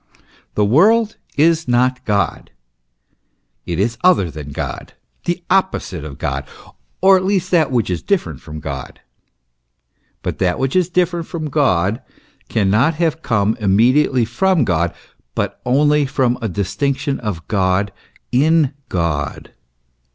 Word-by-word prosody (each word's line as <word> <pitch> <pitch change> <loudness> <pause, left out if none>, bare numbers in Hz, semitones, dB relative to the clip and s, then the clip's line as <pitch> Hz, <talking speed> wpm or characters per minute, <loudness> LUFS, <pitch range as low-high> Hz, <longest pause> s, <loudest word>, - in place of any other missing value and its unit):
The 105 - +3
world 210 - +4 0.2
is 160 +1 +3
not 130 +1 +1
God; 100 -2 -1 1.2
it 85 - -2
is 115 +4 0
other 175 - +4
than 75 -2 -8
God, - - -5 0.3
the 175 0 -2
opposite 185 - 0
of 75 -2 -8
God, 70 -4 -2 0.6
or 190 0 +7
at 185 - -2
least 185 -2 0
that 165 -4 +3
which 120 -5 0
is 90 - -2
different 85 - -1
from 75 0 -8
God. 70 -3 -7 1.2
But - - -4
that 90 -2 +1
which 135 +3 -1
is 180 -2 +2
different 175 -2 0
from 155 -3 -5
God, 110 - +1 0.5
cannot 110 +10 +2
have 165 -1 0
come 110 -4 +1
immedi 115 +8 +3
ately 125 -4 0
from 170 +7 +2
God, 85 -2 +1 0.4
but - - -3
only 145 +2 +3
from 130 -3 0
a 115 - -2
distinction 135 +9 -1
of 100 -8 -5
God 100 0 +1 0.4
in 150 +2 +3 0.2
God. 85 -5 -2
125 Hz, 135 wpm, -18 LUFS, -, 1.2 s, or